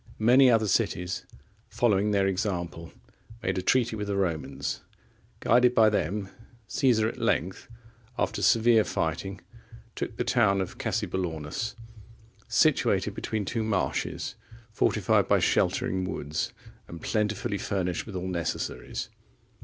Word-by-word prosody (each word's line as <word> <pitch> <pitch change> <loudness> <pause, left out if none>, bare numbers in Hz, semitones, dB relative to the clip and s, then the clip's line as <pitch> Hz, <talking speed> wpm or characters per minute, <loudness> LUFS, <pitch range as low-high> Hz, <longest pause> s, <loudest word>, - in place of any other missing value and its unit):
Many 125 +4 +6
other 110 -3 +3
cities, 90 -1 -1 0.4
following 105 -3 +2
their 100 -2 +2
example, 90 -4 -2 0.5
made 95 0 0
a - - -2
treaty 120 +3 +2
with 105 -1 -4
the 100 - -1
Romans. 80 -7 -2 0.6
Guided 125 +1 +4
by 110 -1 +6
them, 100 +1 -1 0.4
Caesar 120 -6 +3
at - - -5
length, 95 +4 -1 0.5
after - - -1
severe 115 -1 +5
fighting, 95 +4 -3 0.5
took 110 - -4
the - - 0
town 115 -6 +3
of 95 - -4
Cassobellaunus,(37) 85 +3 -2 0.7
situated - - +2
between 110 -2 -3
two 115 - -2
marshes, 105 -4 -1 0.4
fortified - - +2
by - - +4
sheltering 95 0 +1
woods, 75 -4 -3 0.4
and 85 - -9
plentifully 105 -2 -1
furnished 90 -1 -2
with 105 - -7
all 90 0 -3
necessaries. 85 -3 -3
100 Hz, 120 wpm, -27 LUFS, 90-110 Hz, 0.7 s, Many